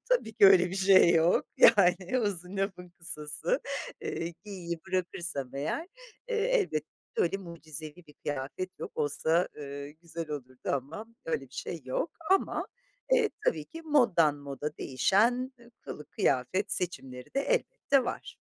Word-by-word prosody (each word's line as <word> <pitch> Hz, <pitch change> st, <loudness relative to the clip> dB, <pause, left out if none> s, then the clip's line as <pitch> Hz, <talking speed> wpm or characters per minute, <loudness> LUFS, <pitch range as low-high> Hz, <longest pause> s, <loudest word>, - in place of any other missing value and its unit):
Tabii -, -, +2 dB
ki 210 Hz, -3 st, +8 dB
öyle 180 Hz, -2 st, +6 dB
bir -, -, -4 dB
şey 190 Hz, -2 st, +7 dB
yok, 165 Hz, +1 st, +4 dB
yani, 190 Hz, 0 st, +5 dB
uzun 190 Hz, -3 st, -3 dB
lafın 190 Hz, -2 st, -2 dB
kısası. 170 Hz, -, -3 dB, 0.4 s
Eee, 175 Hz, -, -3 dB
geyiği 175 Hz, -5 st, -5 dB
bırakırsam 175 Hz, -7 st, -3 dB
eğer, 150 Hz, -, -2 dB, 0.4 s
eee, 475 Hz, -, 0 dB
elbette 430 Hz, -, +1 dB, 0.3 s
öyle 175 Hz, +3 st, +2 dB
mucizevi 160 Hz, -2 st, -8 dB
bir 150 Hz, -, -17 dB
kıyafet 145 Hz, +7 st, -4 dB
yok -, -, -6 dB
olsa, 160 Hz, +4 st, +1 dB
ııı, 140 Hz, -1 st, -6 dB
güzel 165 Hz, 0 st, -8 dB
olurdu 130 Hz, -3 st, -5 dB
ama 145 Hz, -, -3 dB, 0.2 s
öyle 165 Hz, -, -1 dB
bir 130 Hz, -, -18 dB
şey 170 Hz, -, -5 dB
yok 130 Hz, -, -1 dB, 0.2 s
ama, 385 Hz, -, +2 dB, 0.5 s
eee, 470 Hz, -4 st, +4 dB
tabii 155 Hz, -2 st, +1 dB
ki 330 Hz, -, -10 dB
moddan 225 Hz, -, +4 dB
moda 145 Hz, +1 st, -5 dB
değişen, 220 Hz, -, +2 dB
eee, 235 Hz, 0 st, -18 dB
kılık 150 Hz, -, -9 dB
kıyafet 140 Hz, +10 st, +1 dB
seçimleri 130 Hz, -8 st, -4 dB
de 275 Hz, -, +2 dB
elbette -, -, +1 dB
var. -, -, -5 dB
175 Hz, 145 wpm, -30 LUFS, 150-210 Hz, 0.5 s, ki